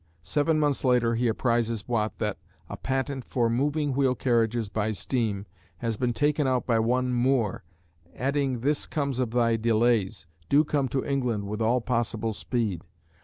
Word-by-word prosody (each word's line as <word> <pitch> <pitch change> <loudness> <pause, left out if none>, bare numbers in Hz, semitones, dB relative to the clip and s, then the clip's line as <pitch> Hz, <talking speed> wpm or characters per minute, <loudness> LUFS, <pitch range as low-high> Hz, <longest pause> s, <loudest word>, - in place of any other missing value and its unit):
Seven 155 - +1
months 145 -2 +1
later 125 -3 +3
he 120 +1 +1
apprises 115 -1 0
Watt 110 -3 -1
that 105 -3 -2 0.3
"a - - -5
patent 135 0 -2
for 120 -2 0
moving 145 +3 0
wheel 130 -1 +2
carriages 115 -1 +1
by 110 +1 -1
steam 105 -3 -2 0.3
has 115 -2 -2
been 120 +2 0
taken 145 +4 +1
out 130 -1 +1
by 115 -2 +2
one 125 +2 +1
Moore," 120 -4 +1 0.5
adding 135 -2 -1
"this 145 +3 0
comes 140 -4 -2
of 125 -3 0
thy 115 -1 +2
delays; 110 -5 +1 0.2
do 145 +2 +5
come 145 -3 0
to 130 +1 -2
England 125 -7 -1
with 105 +2 -4
all 120 +3 +2
possible 115 -2 -1
speed." 105 -5 -2
120 Hz, 165 wpm, -27 LUFS, 115-135 Hz, 0.5 s, do